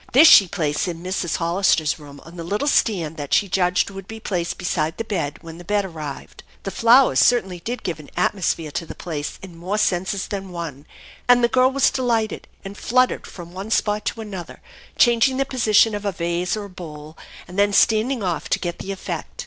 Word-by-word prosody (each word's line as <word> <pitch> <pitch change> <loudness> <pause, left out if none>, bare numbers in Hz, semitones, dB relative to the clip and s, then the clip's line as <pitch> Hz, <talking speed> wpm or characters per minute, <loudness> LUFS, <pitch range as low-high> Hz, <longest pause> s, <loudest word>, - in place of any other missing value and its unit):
This 295 +6 +8
she 200 -10 +9
placed 155 -3 -1
in 170 -1 -5
Mrs. 185 -2 -2
Hollister's 170 -2 +1
room 145 -1 -12
on 165 +2 -13
the 170 - -6
little 205 - -2
stand 170 - +1
that 145 -2 0
she 200 - +2
judged 180 0 +1
would 195 -1 -9
be 225 0 -8
placed 180 -6 -3
beside 160 -3 -1
the - - -2
bed 165 -9 -3
when 165 0 -10
the - - -10
bed 205 +2 0
arrived. 155 -6 -8 0.2
The 195 - -4
flowers 240 +5 +5
certainly 190 -8 +3
did 240 +8 -5
give 170 -4 -3
an 150 - -12
atmosphere 175 -4 0
to 165 - -3
the - - -8
place 150 -4 -5
in 185 -3 -10
more 185 +5 -3
senses 190 0 0
than 195 -2 -5
one; 160 -5 -7 0.4
and 245 0 +5
the - - +6
girl 255 +2 +4
was 275 +1 +2
delighted, 230 -4 -1 0.2
and 195 +1 -7
fluttered 255 +4 +1
from 175 -2 -10
one 195 +3 -6
spot 210 -1 +1
to 225 - -3
another, 195 -6 -8 0.4
changing 240 +2 +4
the 275 - +1
position 225 -4 +3
of 205 0 -4
a 200 - 0
vase 175 +2 -2
or 205 -1 -5
bowl, 155 -4 -10 0.3
and 180 +3 -5
then 205 0 +4
standing 220 +4 +2
off 175 -4 -2
to - - +2
get 175 -1 -4
the 195 - -5
effect. 195 - -6
190 Hz, 205 wpm, -22 LUFS, 170-220 Hz, 0.4 s, she